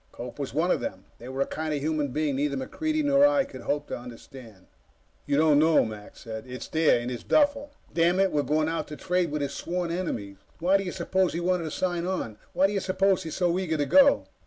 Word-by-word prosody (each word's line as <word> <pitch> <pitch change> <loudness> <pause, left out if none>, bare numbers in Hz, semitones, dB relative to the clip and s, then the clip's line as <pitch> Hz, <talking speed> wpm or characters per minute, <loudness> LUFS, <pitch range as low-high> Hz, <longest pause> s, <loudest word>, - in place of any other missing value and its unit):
Cope - - -9
was - - -3
one - - +1
of - - +2
them. - - -6
They 120 - -9
were 135 +1 -3
a - - +3
kind 155 -1 -3
of - - -2
human 150 0 -1
being 145 +1 -1
neither 140 0 -1
MacReidie 310 - -2
nor 280 -1 +4
I 290 -1 +3
could 130 - -10
hope 145 +4 -2
to - - -4
understand. 120 -4 -12 0.6
"You 140 - +1
don't 150 -1 +5
know," 160 -2 +4
Mac 105 -2 -9
said. 110 0 -7
"It's 125 0 -7
there. 160 -6 +3
In 120 +1 -4
his 120 -3 -6
duffel. 285 -1 +2 0.2
Damn 170 +2 +3
it, 195 -1 +3
we're 150 - +1
going 155 +2 +1
out 165 -1 -2
to 150 - -7
trade 180 +1 0
with 150 0 -2
his 140 - -3
sworn 175 0 -3
enemies! 115 - -4 0.2
Why 185 +4 +3
do 195 - -3
you 180 - -4
suppose 185 +1 0
he 170 - -2
wanted 175 -1 0
to - - -3
sign 175 +1 -2
on? 115 - -3
Why 190 - +3
do 200 - +1
you 200 - +1
suppose 190 0 +1
he's 160 - -6
so 180 -1 +1
eager 165 -4 -1
to 145 - 0
go!" 280 - +5
160 Hz, 245 wpm, -27 LUFS, 140-185 Hz, 0.6 s, don't